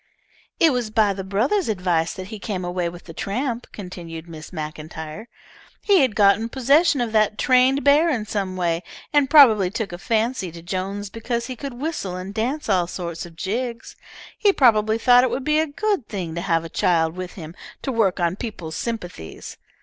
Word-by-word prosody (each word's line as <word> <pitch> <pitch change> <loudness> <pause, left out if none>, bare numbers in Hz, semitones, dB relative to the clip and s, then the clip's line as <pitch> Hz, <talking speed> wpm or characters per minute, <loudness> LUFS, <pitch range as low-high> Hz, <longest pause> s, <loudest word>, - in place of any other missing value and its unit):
"It 325 -4 +5
was 245 -3 -1
by 215 -2 +2
the 190 0 -5
brother's 230 - 0
advice 180 -5 0
he 195 +3 -7
came 190 -4 -4
away 175 -1 -1
with 175 +1 -11
that 165 -1 -12
tramp," 235 +3 -2
continued 170 -4 -8
Mrs. 160 -2 -10
MacIntyre. 155 +4 -7 0.6
"He 400 -3 +5
had 255 -8 +2
gotten 205 +2 +4
possession 280 +4 +3
of 235 -2 -1
that 215 -1 +2
trained 260 +2 +3
bear 295 +4 +5
in 235 -8 -1
some 195 -3 -3
way, 170 -2 0 0.3
and 290 -2 +3
probably 225 - +7
took 215 0 -4
a 175 - -7
fancy 220 -3 -1
to 170 -1 -10
Jones 195 +3 -4
because 235 +1 -3
he 255 0 -6
could 275 0 -7
whistle 250 - -3
and 185 +2 -6
dance 250 +8 -2
all 185 -4 +2
sorts 170 -1 -5
of 165 - -16
jigs. 230 +6 -4 0.4
He 410 - +3
probably 220 - +4
thought 245 +2 +6
it 260 - +2
would 265 - -3
be 300 +2 +2
a 320 - +1
good 390 - -1
thing 180 -6 -4
to 170 - -3
have 165 -3 +1
a - - -4
child 160 -1 +1
with 185 -1 -6
him 165 -3 -9 0.3
to 270 - -1
work 205 -6 +1
on 175 +1 0
peoples' 175 -9 -6
sympathies. 180 - -6
210 Hz, 190 wpm, -22 LUFS, 180-250 Hz, 0.6 s, probably